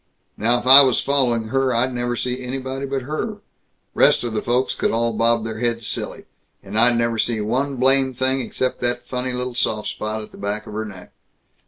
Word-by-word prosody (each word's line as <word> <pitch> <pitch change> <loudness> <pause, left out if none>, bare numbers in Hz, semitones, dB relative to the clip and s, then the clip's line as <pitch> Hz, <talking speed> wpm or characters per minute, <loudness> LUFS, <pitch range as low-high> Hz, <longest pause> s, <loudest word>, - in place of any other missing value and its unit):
Now 120 +3 +1
if - - -10
I 135 +2 +11
was 130 -4 +3
following 120 -5 0
her, 135 -1 +1
I'd 125 +2 0
never 120 0 -2
see 125 +1 -3
anybody 135 +2 -4
but 135 -1 -3
her; 155 - -4 0.6
rest - - +4
of 120 -2 -3
the 110 - -1
folks 125 +2 0
could - - -1
all 115 0 0
bob 115 0 +1
their 110 0 -5
heads 115 -1 -1
silly, - - -4 0.4
and 100 +1 -9
I'd 120 +2 +5
never 115 -1 0
see 115 0 0
one 130 +6 -1
blame 130 0 +2
thing 130 +1 0
except 130 +1 -2
that 120 0 -1
funny 125 0 -3
little 125 0 -3
soft 110 -3 -1
spot 110 0 -4
at - - -13
the - - -14
back 105 +2 -3
of 105 - -10
her 110 +1 -3
neck. 95 -4 -11
120 Hz, 210 wpm, -21 LUFS, 115-130 Hz, 0.6 s, I